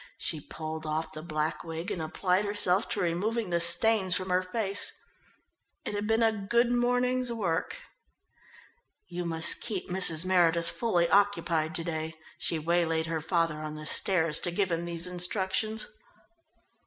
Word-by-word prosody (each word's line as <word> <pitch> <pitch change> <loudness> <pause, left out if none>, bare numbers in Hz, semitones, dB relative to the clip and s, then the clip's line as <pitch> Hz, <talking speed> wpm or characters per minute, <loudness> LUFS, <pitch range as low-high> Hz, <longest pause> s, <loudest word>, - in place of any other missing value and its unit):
She 155 - -2
pulled 155 +1 -7
off 155 +1 -3
the 155 - -7
black 155 -1 -3
wig 165 +4 -6
and 185 -5 -3
applied 180 +4 0
herself 205 -1 +1
to 235 -3 -3
removing 200 +4 -1
the 170 - +1
stains 190 +2 +5
from 185 -1 -2
her 180 0 +3
face. 195 +1 0 0.9
It - - -4
had 205 0 -3
been 225 +1 +2
a 225 - +4
good 235 +4 0
morning's 245 +1 +1
work. 190 -8 -2 1.3
"You 175 0 -5
must 165 0 +1
keep 210 -6 -4
Mrs. 180 -3 +2
Meredith 170 -2 +2
fully 180 -8 0
occupied 170 -6 +1
to 165 - -3
day." 160 -1 -4 0.2
She 165 - +3
waylaid 165 0 0
her 165 -1 -3
father 165 -1 0
on 155 0 -6
the 155 0 -8
stairs 165 -3 +4
to - - 0
give 185 +1 -1
him 170 0 -2
these 170 0 -1
instructions. 190 +4 0
175 Hz, 155 wpm, -28 LUFS, 165-205 Hz, 1.3 s, stains